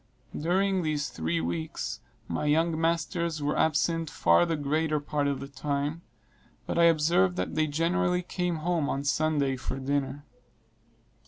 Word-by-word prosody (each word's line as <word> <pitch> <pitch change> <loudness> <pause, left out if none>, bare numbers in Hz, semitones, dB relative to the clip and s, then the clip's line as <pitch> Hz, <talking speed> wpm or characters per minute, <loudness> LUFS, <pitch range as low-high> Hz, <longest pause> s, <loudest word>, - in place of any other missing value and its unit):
During 190 +4 +1
these 150 -3 -1
three 80 +1 -2
weeks, 80 -1 -3 0.3
my 85 - -2
young 160 +2 +2
masters 170 0 0
were 145 - 0
absent 165 +1 +1
far 85 - +3
the 165 - 0
greater 150 +1 0
part 145 0 -1
of 140 -1 -1
the 140 - -6
time; 145 +3 -3 0.6
but - - -1
I 170 - +6
observed 155 - +3
that 90 - -2
they 155 0 +1
generally 180 +4 +1
came 180 -1 -2
home 170 -5 +1
on 140 - -2
Sunday 145 -2 +1
for 130 +1 -4
dinner. 140 +1 -2
150 Hz, 150 wpm, -28 LUFS, 140-165 Hz, 0.6 s, I